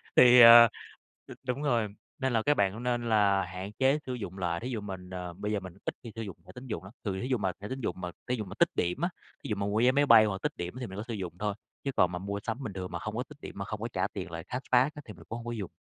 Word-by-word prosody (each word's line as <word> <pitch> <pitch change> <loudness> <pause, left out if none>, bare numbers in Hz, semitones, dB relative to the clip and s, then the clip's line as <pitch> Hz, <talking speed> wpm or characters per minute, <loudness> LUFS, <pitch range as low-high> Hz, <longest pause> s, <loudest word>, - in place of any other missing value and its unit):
Thì, 125 0 +9
ờ, 115 0 +11 0.6
ờ - - -9
đúng 125 +3 -1
rồi, 120 -7 +2 0.3
nên 130 -2 0
là 115 - +3
các 145 - +4
bạn 100 -1 +2
cũng 115 - -7
nên 120 -1 -1
là 100 -3 +3
hạn 95 +3 -7
chế 135 +3 +4
sử 130 - -3
dụng 100 -6 -6
lại. 85 -2 -1
Thí 125 - -5
dụ 115 -4 -3
mình, 95 -3 -7
ờ, 90 -1 -6
bây 105 +4 -4
giờ 105 - 0
mình 95 -2 -9
ít - - -1
khi 115 - -8
sử 115 - -4
dụng 100 -5 -7
thẻ - - -12
tín 125 +1 -9
dụng 110 -5 -4
lắm, 95 +3 -12
thường 95 -2 -2
thí 125 - -3
dụ 130 -2 +1
mà 95 -3 0
thẻ 100 - -5
tín 130 - -4
dụng - - -2
mà 90 -1 -4 0.2
thí 125 - +1
dụ 110 -3 -4
mà 95 +1 -9
tích 170 - +5
điểm 90 - -1
á, 175 - +2 0.3
thí - - -6
dụ 105 - 0
mà 100 0 -2
mua 100 +2 0
vé 125 +2 +5
máy 145 +2 +3
bay 115 -4 +8
hoặc 95 -2 -2
tích - - 0
điểm 90 0 -4
thì 125 - -4
mình 95 - -8
có 105 - -3
sử 115 - -4
dụng 95 -5 -4
thôi, 105 -1 -1 0.3
chứ 140 - -1
còn 90 -1 +4
mà 90 - -4
mua 100 +2 -4
sắm 120 +4 -4
bình 105 - -5
thường 95 -1 -5
mà - - -4
hông - - -5
có - - -1
tích - - -16
điểm, - - -8
mà - - -3
hông - - -5
có - - -2
trả - - +1
tiền - - -5
lại, 85 0 -6
cashback 130 - +1
á 150 - -8
thì 105 - -9
mình - - -15
cũng 115 - -4
hông 120 - -9
có 120 - -3
dùng. 105 -6 -5
110 Hz, 335 wpm, -29 LUFS, 95-125 Hz, 0.6 s, ờ